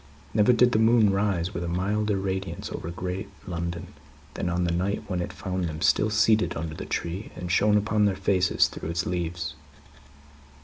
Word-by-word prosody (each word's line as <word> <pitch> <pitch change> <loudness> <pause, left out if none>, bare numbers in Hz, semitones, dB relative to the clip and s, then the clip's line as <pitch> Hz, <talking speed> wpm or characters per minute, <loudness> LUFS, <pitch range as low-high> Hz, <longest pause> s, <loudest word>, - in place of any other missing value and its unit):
Never 105 +3 +5
did 125 +1 +4
the 110 - +2
moon 110 -2 +5
rise 100 -2 0
with 85 - -3
a - - -3
milder 100 +4 0
radiance 95 0 -3
over 85 - -5
great 90 +3 -4 0.2
London, 85 -2 -4 0.4
than 90 - -2
on 90 +1 0
that 85 -1 0
night 95 +4 -1
when 90 -2 -2
it - - -4
found 95 -2 -3
them 80 -2 -4
still 110 - +3
seated 110 0 +3
under 80 -1 -4
the - - -7
tree, 90 +5 -3
and 90 -1 -5
shone 105 +3 +4
upon 105 0 +2
their 100 -2 +2
faces 95 -1 +2
through - - -7
its 85 +1 -1
leaves. 85 -3 -3
95 Hz, 185 wpm, -26 LUFS, 85-105 Hz, 0.4 s, Never